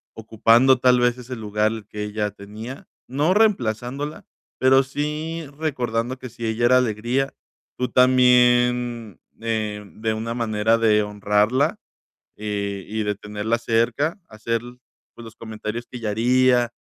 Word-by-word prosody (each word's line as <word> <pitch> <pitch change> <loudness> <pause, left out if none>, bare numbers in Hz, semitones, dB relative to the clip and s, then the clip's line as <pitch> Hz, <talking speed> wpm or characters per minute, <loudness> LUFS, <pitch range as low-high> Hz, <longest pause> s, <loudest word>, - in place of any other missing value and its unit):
ocupando 115 +4 +3
tal 125 0 +4
vez 120 0 +1
ese 125 +1 -7
lugar 105 0 -1
que 105 - -7
ella 105 0 -2
tenía?, 105 +6 -10 0.2
no 145 +7 +1
reemplazándola, 140 - 0 0.3
pero 135 +1 +5
sí 150 +4 -4
recordando 125 -5 -2
que 130 - -8
si 120 0 -7
ella 110 +1 0
era 130 +1 +6
alegría, 125 +3 0 0.5
tú 125 - 0
también, 125 -3 +3 0.2
eh, 110 -2 -2
de 110 0 -1
una 115 +1 -4
manera 110 -1 +1
de 110 -2 +3
honrarla, 105 +5 +1 0.6
eh, 100 -2 -4
y 110 +1 -2
de 105 0 -1
tenerla 105 +3 -3
cerca, 120 - 0
hacer, 115 +1 -2 0.5
pues, 120 - -11
los 115 0 -12
comentarios 110 +1 -6
que 125 - -9
ella 110 -2 -3
haría, 120 +2 +3
115 Hz, 135 wpm, -22 LUFS, 110-125 Hz, 0.6 s, era